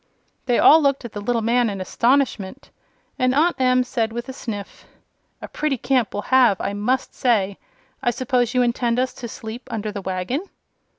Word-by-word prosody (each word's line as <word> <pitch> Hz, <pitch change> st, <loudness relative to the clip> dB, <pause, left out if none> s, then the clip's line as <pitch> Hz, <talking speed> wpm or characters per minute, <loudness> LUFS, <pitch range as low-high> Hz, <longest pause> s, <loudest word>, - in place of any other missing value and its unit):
They 245 Hz, -, +3 dB
all 320 Hz, +2 st, +7 dB
looked 275 Hz, -3 st, +1 dB
at 235 Hz, -, -7 dB
the 205 Hz, -, -6 dB
little 230 Hz, +1 st, -1 dB
man 235 Hz, +1 st, +2 dB
in 200 Hz, -1 st, -5 dB
astonishment, 235 Hz, 0 st, 0 dB, 0.5 s
and 255 Hz, 0 st, +2 dB
Aunt 335 Hz, +4 st, +3 dB
Em 255 Hz, 0 st, +3 dB
said, 235 Hz, -3 st, -2 dB
with 240 Hz, +2 st, -5 dB
a 265 Hz, -, -6 dB
sniff: 205 Hz, -6 st, -7 dB, 0.6 s
"A -, -, -5 dB
pretty 300 Hz, -3 st, -2 dB
camp 250 Hz, -1 st, +1 dB
we'll 205 Hz, -, -3 dB
have, 245 Hz, -7 st, +5 dB
I -, -, -2 dB
must 230 Hz, +6 st, -1 dB
say! 205 Hz, -6 st, 0 dB, 0.4 s
I -, -, +1 dB
suppose 245 Hz, 0 st, 0 dB
you 250 Hz, -, +4 dB
intend 235 Hz, 0 st, 0 dB
us 255 Hz, +1 st, 0 dB
to 240 Hz, -, -7 dB
sleep 225 Hz, +2 st, -8 dB
under 215 Hz, -1 st, -3 dB
the 205 Hz, -1 st, -6 dB
wagon." 190 Hz, -, -2 dB
240 Hz, 185 wpm, -22 LUFS, 215-255 Hz, 0.6 s, all